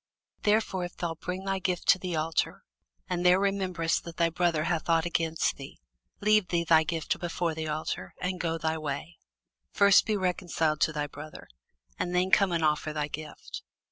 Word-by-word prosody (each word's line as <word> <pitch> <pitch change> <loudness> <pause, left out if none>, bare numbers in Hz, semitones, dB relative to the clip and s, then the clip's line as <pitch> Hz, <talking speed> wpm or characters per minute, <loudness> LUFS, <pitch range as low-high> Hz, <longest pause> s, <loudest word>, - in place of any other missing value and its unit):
Therefore 210 -3 +1
if 175 - -10
thou 170 -2 -2
bring 180 +3 -5
thy 195 0 0
gift 180 -2 -2
to 185 - +7
the 180 -2 -3
altar, 160 +1 -1 0.4
and 180 -1 -2
there 180 +1 +6
rememberest 190 -4 0
that 170 -1 -9
thy 170 -1 +2
brother 165 -2 +1
hath 165 0 -1
ought 165 0 +3
against 165 -1 0
thee; 135 - -10 0.4
leave 210 -2 +4
there 170 -1 0
thy 160 -1 +6
gift 165 0 -2
before 170 -1 -2
the 160 0 -4
altar, 150 - -4
and 180 0 -2
go 165 -1 -1
thy 160 0 -1
way; 155 +3 -5 0.5
first 200 -1 +5
be 215 -1 +1
reconciled 175 -4 0
to - - +3
thy 150 -1 -2
brother, 150 +1 -10 0.5
and 180 0 -1
then 185 +1 +2
come 195 -2 +5
and 165 -2 +1
offer 150 0 0
thy 150 -1 -2
gift. 155 0 -8
170 Hz, 185 wpm, -28 LUFS, 160-180 Hz, 0.5 s, to